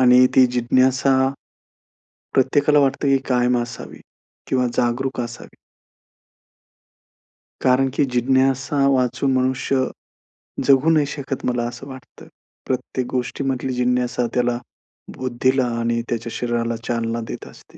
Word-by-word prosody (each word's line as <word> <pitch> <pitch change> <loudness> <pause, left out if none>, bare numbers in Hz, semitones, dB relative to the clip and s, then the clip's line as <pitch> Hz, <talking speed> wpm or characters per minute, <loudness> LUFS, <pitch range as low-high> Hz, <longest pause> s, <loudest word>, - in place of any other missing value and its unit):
आणि 125 0 +6
ती 130 - +7
जिज्ञासा, 130 +2 +2 1.2
प्रत्येकाला 145 +3 +3
वाटतं 140 0 +1
की 135 0 +4
कायम 125 -1 +2
असावी 120 -1 -9 0.5
किंवा 125 -1 +1
जागरूक 125 +2 0
असावी. 120 -1 -8 2.1
कारण 130 +1 +3
की 145 - +2
जिज्ञासेवाचून 130 +1 +1
मनुष्य 130 +1 +1 0.8
जगू 140 +3 +4
नाही 155 -2 +3
शकत, 140 -2 -5
मला 120 -1 0
असं 120 +3 -9
वाटतं. 130 -2 -12 0.4
प्रत्येक 130 -1 -3
गोष्टीमधली 130 +1 -2
जिज्ञासा 125 0 0
त्याला 120 -1 +1 0.6
बुद्धीला 130 +1 +1
आणि 115 0 0
त्याच्या 115 0 -3
शरीराला 120 -1 -1
चालना 115 -1 -1
देत - - -7
असते. - - -17
130 Hz, 110 wpm, -21 LUFS, 120-135 Hz, 2.1 s, ती